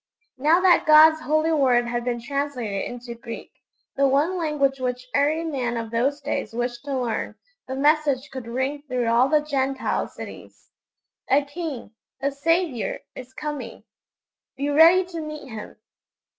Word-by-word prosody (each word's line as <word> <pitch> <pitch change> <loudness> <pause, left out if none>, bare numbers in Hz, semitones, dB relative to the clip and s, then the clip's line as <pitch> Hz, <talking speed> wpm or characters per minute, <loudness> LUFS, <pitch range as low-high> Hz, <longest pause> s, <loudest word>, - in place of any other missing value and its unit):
Now 310 +6 +4
that 365 -3 +4
God's 310 +1 +7
Holy 310 +1 +1
Word 255 -6 +3
had 240 0 -2
been 240 -1 -2
translated 250 -6 -3
into 245 0 -7
Greek, 230 0 -9 0.4
the 275 0 +3
one 290 +7 +2
language 295 -5 0
which 250 0 -3
every 300 +3 +2
man 255 -7 -2
of 225 -1 -5
those 265 +5 0
days 275 -6 -3
wished 240 +1 -3
to 275 -2 -2
learn, 240 -3 -3 0.3
the 265 - -4
message 290 -1 +2
could 260 -3 -7
ring 260 +4 -2
through 250 -2 -1
all 235 +3 +3
the 305 -1 +4
Gentile 275 -2 -1
cities: - - -11 0.6
'A 280 +2 +4
King, 285 -6 -6 0.3
a 280 +1 0
Saviour, 320 - 0
is 255 0 -10
coming; 290 -6 -6 0.7
be 280 +2 -1
ready 335 +5 +6
to 340 -2 -6
meet 305 -2 -7
Him!' 220 -2 -8
275 Hz, 155 wpm, -24 LUFS, 245-305 Hz, 0.7 s, God's